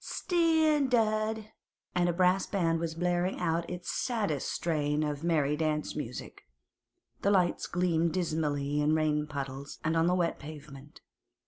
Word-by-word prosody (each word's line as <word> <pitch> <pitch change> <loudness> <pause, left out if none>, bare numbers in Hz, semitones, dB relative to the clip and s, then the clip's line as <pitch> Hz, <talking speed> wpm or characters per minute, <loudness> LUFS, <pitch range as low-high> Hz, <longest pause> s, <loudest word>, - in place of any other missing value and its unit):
Steendard!' 255 - +1 0.4
and 175 0 +2
a - - +3
brass 180 +2 +2
band 165 -4 +1
was 165 -1 -3
blaring 175 +2 0
out 170 -1 0
its 180 0 -4
saddest 205 - -1
strain 150 -2 0
of 150 0 -3
merry 150 -4 +2
dance 155 -1 -1
music. 125 -5 -6 0.8
The 200 - +2
lights 185 -4 +2
gleamed 170 -2 +1
dismally 150 -4 0
in 150 +1 +3
rain 150 -1 +1
puddles 140 -1 -6
and 160 +1 +1
on 165 +1 +3
the 180 - +3
wet 175 -2 0
pavement. 145 -1 -11
165 Hz, 140 wpm, -30 LUFS, 150-185 Hz, 0.8 s, a